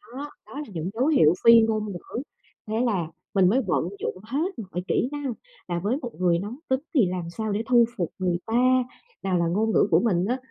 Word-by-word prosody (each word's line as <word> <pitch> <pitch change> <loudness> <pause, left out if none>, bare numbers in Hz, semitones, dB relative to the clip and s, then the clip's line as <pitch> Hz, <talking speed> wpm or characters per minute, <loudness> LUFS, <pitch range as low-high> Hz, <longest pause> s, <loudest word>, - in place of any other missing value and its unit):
Đó, 290 +2 -5 0.2
đó - - -13
là 295 - -7
những 170 +1 -3
dấu 250 +6 +1
hiệu 165 - +5
phi 230 0 +8
ngôn 215 -2 0
ngữ. 195 +7 -6 0.5
Thế 220 +1 -1
là 185 -8 0 0.3
mình 190 -2 +4
mới 255 +6 +3
vận 175 -1 +1
dụng - - -3
hết 285 - -2
mọi 185 -4 -5
kỹ 250 - +1
năng 290 -4 -3 0.3
là 175 -1 -1
với 210 +9 0
một 240 -3 -5
người 175 -2 +3
nóng 210 +7 -6
tính 260 0 +2
thì 255 - +5
làm 180 -2 -4
sao 220 +4 -3
để 205 +2 -1
thu 240 -2 +6
phục 175 -5 -2
người 180 -2 +1
ta, 255 +3 +3 0.4
nào 190 -2 +1
là 170 - +1
ngôn 215 +6 +1
ngữ - - +3
của 165 - +6
mình 185 -5 +1
á 245 +5 0
215 Hz, 230 wpm, -25 LUFS, 180-245 Hz, 0.5 s, phi